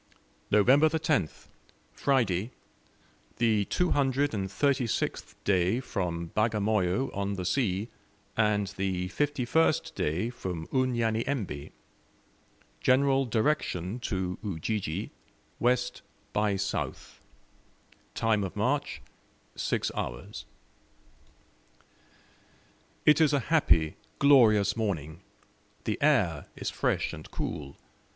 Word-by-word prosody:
November 130 +9 +5
10th. 155 - -1 0.5
Friday. 115 -7 +1 0.9
The 110 -3 +2
236th 135 - 0
day 95 +3 +2
from 85 -9 -3
Bagamoyo 110 +1 +1
on 100 0 -1
the 90 -2 -4
Sea, 100 -2 0 0.5
and 105 -2 +2
the 95 -1 -1
51st 145 +5 +1
day 90 +10 -1
from 90 -9 -5
Unyanyembe. 115 - -1 1.1
General 135 +1 +3
direction 110 - 0
to 95 -6 -3
Ujiji, 100 -1 -3 0.5
west 125 0 +1 0.3
by 105 -1 +1
south. 100 +1 -4 0.9
Time 110 -2 +1
of 95 - -5
march, - - -1 0.5
six - - -1
hours. - - -5 2.6
It 150 +2 +6
is 150 -2 +4
a 145 - +3
happy, 80 - +3 0.2
glorious 110 -8 +5
morning. 85 -7 -3 0.6
The - - -2
air - - +2
is - - -4
fresh - - 0
and - - -9
cool. 70 -2 -5
110 Hz, 85 wpm, -29 LUFS, 95-130 Hz, 2.6 s, It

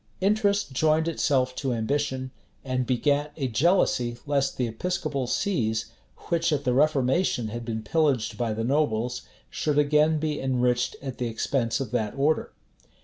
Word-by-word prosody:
Interest 200 -3 +1
joined 155 +3 +2
itself 135 -5 +1
to 135 -3 -1
ambition, 130 +2 -1 0.3
and 130 -1 -1
begat 145 +4 +1
a 135 -4 -1
jealousy 125 - +2
lest 140 -2 0
the 125 - +1
episcopal 140 +2 -2
sees, 115 - -1 0.4
which 170 -1 +2
at 145 -2 0
the 125 - +1
reformation 135 -2 +2
had 120 +2 -5
been 110 -1 -4
pillaged 140 -2 +1
by 120 -2 -1
the 110 +1 -2
nobles, 125 -3 0 0.3
should 150 -2 -1
again 150 +2 +4
be 150 -1 -2
enriched 125 -2 +1
at 135 -3 -6
the 125 - -1
expense 115 +2 -1
of 130 -5 -4
that 110 -3 -1
order. 145 +3 +1
135 Hz, 150 wpm, -26 LUFS, 120-150 Hz, 0.4 s, again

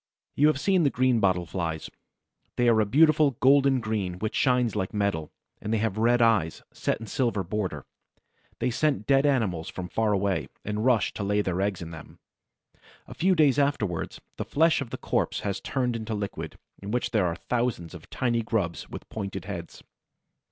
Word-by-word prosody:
You 150 - +5
have 155 -3 +2
seen 190 +2 +2
the 145 - +4
Greenbottle 105 -10 +2
Flies. 80 -3 -3 0.7
They 120 - +2
are 115 -2 +5
a 105 - 0
beautiful 150 +1 +4
golden 135 0 +5
green 105 -6 -2
which 110 +3 -3
shines 125 -4 +2
like 100 0 -2
metal, 100 -7 -1 0.3
and 105 - -4
they 115 - +2
have 110 -1 -1
red 120 +1 +4
eyes, 100 -9 +2
set - - -1
in - - -10
a - - -8
silver 115 -3 0
border. 95 -6 -3 0.7
They 125 - 0
scent 135 -3 0
dead 135 +1 +4
animals 100 - 0
from 90 -1 -6
far 110 +1 +1
away, 100 -1 0 0.2
and 105 +1 -2
rush 125 -4 +2
to 105 - -4
lay 105 +1 +1
their 90 -1 -1
eggs 100 -3 -1
in 85 - -8
them. 80 -2 -11 0.9
A - - -9
few 185 +2 +2
days 145 -4 +4
afterward, 110 - -1 0.2
the - - -2
flesh 160 0 +2
of 135 - -5
the - - -5
corpse - - -1
has 100 -2 -3
turned 125 -3 -1
into 110 -1 -3
liquid, 100 -1 -5 0.2
in 100 - -7
which 125 +3 -1
are 90 -6 +2
thousands 115 -4 -2
of 85 -3 -12
tiny 120 -2 0
grubs 100 -8 -2
with - - -9
pointed 100 -3 -5
heads. 90 -4 -7
110 Hz, 185 wpm, -27 LUFS, 95-130 Hz, 0.9 s, You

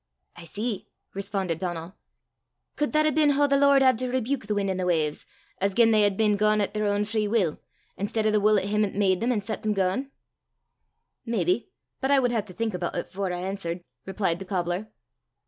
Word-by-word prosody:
"I 175 - -11
see!" 210 +5 -4 0.3
responded 195 -4 -2
Donal. 175 -1 -4 0.8
"Could 295 - -1
that 305 0 +3
hae 310 - +3
been 300 0 +3
hoo 290 +1 +3
the 280 - +2
Lord 280 -1 +5
had 255 -3 +4
to 255 0 -1
rebuke 255 -2 -2
the 210 - 0
win's 200 -1 0
an' 185 - -2
the 185 -1 -1
wawves, 155 -4 0 0.3
as 195 0 0
gien 230 -1 +5
they 215 -1 +4
had 205 -2 +2
been 210 -2 +3
gaein' 215 +1 +3
at 200 - -1
their 210 -1 0
ain 205 0 +1
free 215 0 -1
wull, 200 -8 +1 0.4
i'stead 215 +2 -1
o' 215 - +3
the 210 - +3
wull 210 +1 +4
o' 190 - +1
him 210 +1 +1
'at 200 - -2
made 190 -3 +2
them 240 +2 +1
an' 220 -4 0
set 220 +2 -5
them 215 -1 0
gaein'?" 195 +8 0 1.1
"Maybe; 225 - 0 0.3
but 265 - -1
I 280 - +5
wud 250 -2 +2
hae 230 -2 +1
to 200 - -13
think 220 +3 -2
aboot 175 -1 -3
it 175 - -3
afore 190 -1 -3
I 175 0 -3
answert," 185 -2 -4 0.2
replied 190 -3 -1
the 195 - -7
cobbler. 180 +2 -2
205 Hz, 225 wpm, -26 LUFS, 185-230 Hz, 1.1 s, Lord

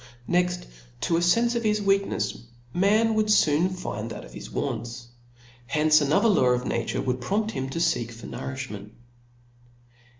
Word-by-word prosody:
Next 180 0 +1 0.4
to 165 - +1
a - - +2
fenfe 230 +8 +3
of 235 - 0
hi$ 210 -1 +1
weaknefs 195 0 +1 0.4
man 215 +5 +3
would 215 -1 +1
foon 160 -2 +4
find 115 - -5
that - - -8
of - - -14
his - - -8
wants. 120 -1 -4 0.6
Hence 155 +3 +4
another 145 +10 +3
law 190 - +4
of 125 0 -2
na - - -1
ture - - -2
would 125 -1 -1
prompt 210 - -1
him 135 -9 -4
to 135 - -5
feek 165 -8 +1
for 115 0 -11
nouriftiment. 130 -6 -6
165 Hz, 165 wpm, -26 LUFS, 125-200 Hz, 0.6 s, foon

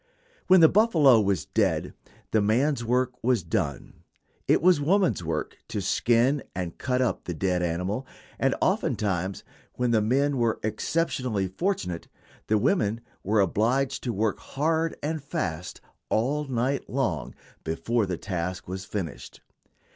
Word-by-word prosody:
When 185 -1 +7
the 160 - +9
buffalo 160 - +5
was 100 -4 0
dead - - 0 0.4
the 110 - +3
man's 120 +5 +2
work 125 +1 0
was 120 -5 +2
done; 75 -4 -3 0.5
it - - +4
was 175 -2 +4
woman's 180 - +2
work 80 -1 -3
to - - -3
skin 120 +4 +2
and 90 -2 -4
cut 130 0 +1
up 125 - -2
the 90 - -4
dead 90 +1 0
animal; 90 +9 -2 0.3
and - - +2
oftentimes, 95 -2 0 0.3
when 125 -1 0
the 110 -2 +3
men 135 +6 +1
were 115 -2 +1
exceptionally 125 - -1
fortunate, 95 - -2 0.4
the 110 - +3
women 110 - +1 0.2
were 105 +2 +2
obliged 125 +8 +1
to 120 - 0
work 110 0 -1
hard 160 +3 -1
and 155 -1 -2
fast 85 - -4 0.3
all 140 +7 +1
night 130 +1 -1
long 115 - -2 0.3
before 95 +8 0
the 90 -2 -2
task 90 -1 -4
was 95 +1 -5
finished. 90 -9 -6
115 Hz, 140 wpm, -26 LUFS, 95-135 Hz, 0.5 s, the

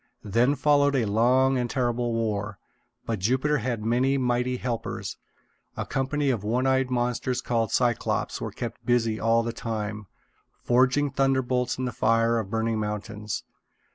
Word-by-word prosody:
Then 120 +7 +2
followed 145 0 +3
a 125 -4 +2
long 125 +5 +3
and 120 -1 -1
terrible 120 -1 0
war. 105 -2 -2 0.5
But 115 -3 -2
Jupiter 130 +9 +1
had 115 -2 -3
many 130 +4 +2
mighty 125 0 0
helpers. 120 -2 -4 0.6
A - - -2
company 135 +1 0
of 115 -5 -2
one 120 +5 0
eyed 130 -1 +2
monsters 125 0 -1
called 115 -4 -1
Cyclopes 120 -2 0
were - - -3
kept - - -6
busy 115 -3 +1
all 115 +1 +3
the 115 0 -3
time, 110 -3 -4 0.6
forging 130 +4 +3
thunderbolts 130 -2 +1
in 130 - -2
the 125 - -2
fire 115 0 +2
of 100 -4 -5
burning 110 0 0
mountains. 105 0 -4
120 Hz, 150 wpm, -26 LUFS, 115-130 Hz, 0.6 s, followed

